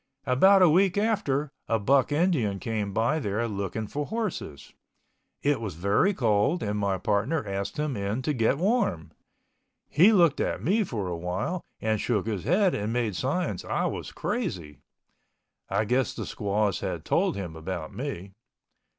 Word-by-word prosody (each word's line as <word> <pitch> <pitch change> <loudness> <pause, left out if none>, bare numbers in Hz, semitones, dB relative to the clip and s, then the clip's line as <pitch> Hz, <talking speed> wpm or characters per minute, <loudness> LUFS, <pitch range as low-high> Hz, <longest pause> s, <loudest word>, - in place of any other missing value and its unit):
About 190 +10 +5
a 175 - +7
week 185 +3 +3
after 150 -10 0 0.2
a 115 - +2
buck 130 +7 +2
Indian 145 - +1
came 105 -1 -3
by 115 +10 +1
there 110 -2 -1
looking 100 +1 -3
for 145 +7 -4
horses. 190 - -4 0.7
It 145 -4 +2
was 100 -7 -4
very 100 - +2
cold 120 - +1
and 105 0 -1
my 100 -2 0
partner 110 - 0
asked 100 0 -3
him 150 -3 -1
in 100 +5 -2
to 150 - 0
get 120 +1 +2
warm. 185 - 0 0.8
He 185 +8 +5
looked 170 -8 +4
at - - -1
me 210 +7 +2
for 110 - -4
a 90 - -3
while 90 - -3 0.2
and 110 -1 0
shook 110 -5 0
his 105 -5 -3
head 185 +1 +3
and 105 +2 -2
made 115 -4 -1
signs 160 - -1
I - - -1
was - - -4
crazy. 90 - -4 0.9
I 100 +3 +1
guess 125 +4 0
the - - -4
squaws 105 -2 -1
had - - -4
told - - +1
him 90 -5 -5
about 80 0 -5
me. 110 -8 -5
115 Hz, 165 wpm, -27 LUFS, 100-160 Hz, 0.9 s, a